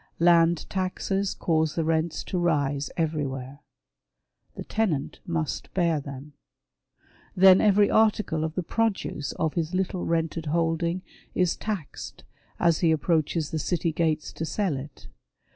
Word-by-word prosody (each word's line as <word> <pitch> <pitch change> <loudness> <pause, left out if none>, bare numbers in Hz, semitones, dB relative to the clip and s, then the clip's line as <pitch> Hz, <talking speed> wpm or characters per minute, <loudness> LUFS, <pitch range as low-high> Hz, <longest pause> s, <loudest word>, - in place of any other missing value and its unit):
Land 170 -1 +4
taxes 190 +1 -1
cause 160 -2 0
the 165 - 0
rents 160 0 0
to 185 - -2
rise 145 -4 0
everywhere. 140 -4 -2 1.0
The - - -6
tenant 180 -11 -1
must 165 -3 -3
bear 170 -4 +2
them. 140 +1 -9 1.0
Then 190 0 +7
every 205 -1 +5
article 215 -7 +2
of 160 0 -3
the 185 - -1
produce 200 -8 -1
of 160 - -1
his 170 +1 -2
little 185 -1 -1
rented 165 -1 -1
holding 170 +3 0 0.3
is 180 -2 +2
taxed 200 -9 -6 0.4
as 170 -2 +3
he 165 -2 +3
approaches 160 -1 0
the 160 - -1
city 165 +1 0
gates 160 -1 -1
to - - -5
sell 165 +1 -1
it. 130 - -9
165 Hz, 135 wpm, -26 LUFS, 155-180 Hz, 1.0 s, Then